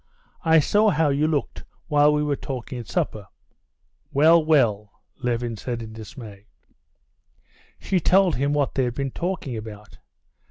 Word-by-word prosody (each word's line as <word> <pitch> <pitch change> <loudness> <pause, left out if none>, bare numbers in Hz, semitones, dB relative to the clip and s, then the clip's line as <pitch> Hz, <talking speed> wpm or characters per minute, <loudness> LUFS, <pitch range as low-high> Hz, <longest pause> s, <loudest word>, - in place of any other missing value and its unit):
"I 160 -1 +5
saw 210 +8 +3
how 160 -4 +2
you 145 +2 +1
looked 150 -3 -2 0.2
while 150 -1 +4
we 150 0 +1
were 145 -1 0
talking 130 -2 -6
at 115 - -9
supper." 105 -3 -3 0.8
"Well, 160 +4 +5
well!" 115 -10 +2 0.3
Levin 120 -1 -2
said 120 +1 -5
in 110 0 -10
dismay. 110 -2 -11 1.3
She 190 - -1
told 185 0 +3
him 140 +3 0
what 145 -2 0
they 130 - +1
had 120 -1 -3
been 135 -1 -3
talking 175 -8 -4
about. 105 -1 -10
140 Hz, 150 wpm, -23 LUFS, 115-155 Hz, 1.3 s, I